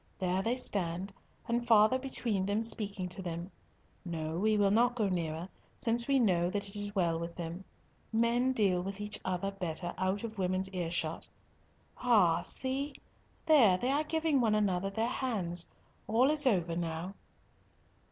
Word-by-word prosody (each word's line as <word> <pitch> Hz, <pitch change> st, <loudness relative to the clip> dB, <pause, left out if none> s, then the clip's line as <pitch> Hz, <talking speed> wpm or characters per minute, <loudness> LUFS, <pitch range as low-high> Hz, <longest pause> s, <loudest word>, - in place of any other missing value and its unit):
There 185 Hz, 0 st, 0 dB
they 235 Hz, +5 st, 0 dB
stand, 190 Hz, -5 st, -1 dB, 0.3 s
and 235 Hz, 0 st, -1 dB
father 220 Hz, +3 st, +5 dB
between 230 Hz, -7 st, -1 dB
them 205 Hz, +2 st, 0 dB
speaking 205 Hz, -4 st, 0 dB
to 190 Hz, +2 st, -2 dB
them. 170 Hz, +1 st, -5 dB, 0.5 s
No, 160 Hz, -3 st, -4 dB
we 215 Hz, +2 st, +2 dB
will 200 Hz, -1 st, +3 dB
not 240 Hz, +3 st, +3 dB
go 215 Hz, -4 st, +1 dB
nearer, 170 Hz, -2 st, -2 dB, 0.3 s
since 235 Hz, +1 st, +1 dB
we 275 Hz, -1 st, +3 dB
know 180 Hz, -7 st, +2 dB
that 200 Hz, +1 st, -1 dB
it 200 Hz, -, -2 dB
is 205 Hz, 0 st, -3 dB
well 170 Hz, -4 st, +1 dB
with 170 Hz, 0 st, -6 dB
them. 170 Hz, +2 st, -6 dB, 0.5 s
Men 235 Hz, +3 st, +2 dB
deal 195 Hz, -7 st, +2 dB
with 195 Hz, +2 st, -6 dB
each 210 Hz, 0 st, -5 dB
other 190 Hz, +1 st, -2 dB
better 175 Hz, -2 st, -4 dB
out 190 Hz, +2 st, 0 dB
of 220 Hz, -3 st, -6 dB
women's 185 Hz, +1 st, 0 dB
earshot. 170 Hz, -3 st, -3 dB, 0.7 s
Ah, 205 Hz, -9 st, +4 dB
see, 270 Hz, +2 st, -1 dB, 0.5 s
there 255 Hz, -, +6 dB
they 250 Hz, +7 st, 0 dB
are 290 Hz, +2 st, +2 dB
giving 315 Hz, -3 st, +1 dB
one 220 Hz, -3 st, +2 dB
another 195 Hz, -2 st, +1 dB
their 220 Hz, +3 st, -1 dB
hands. 195 Hz, -10 st, -1 dB, 0.4 s
All 245 Hz, +6 st, +3 dB
is 300 Hz, -2 st, +2 dB
over 175 Hz, -7 st, +1 dB
now." 170 Hz, +2 st, -3 dB
200 Hz, 160 wpm, -32 LUFS, 180-235 Hz, 0.7 s, there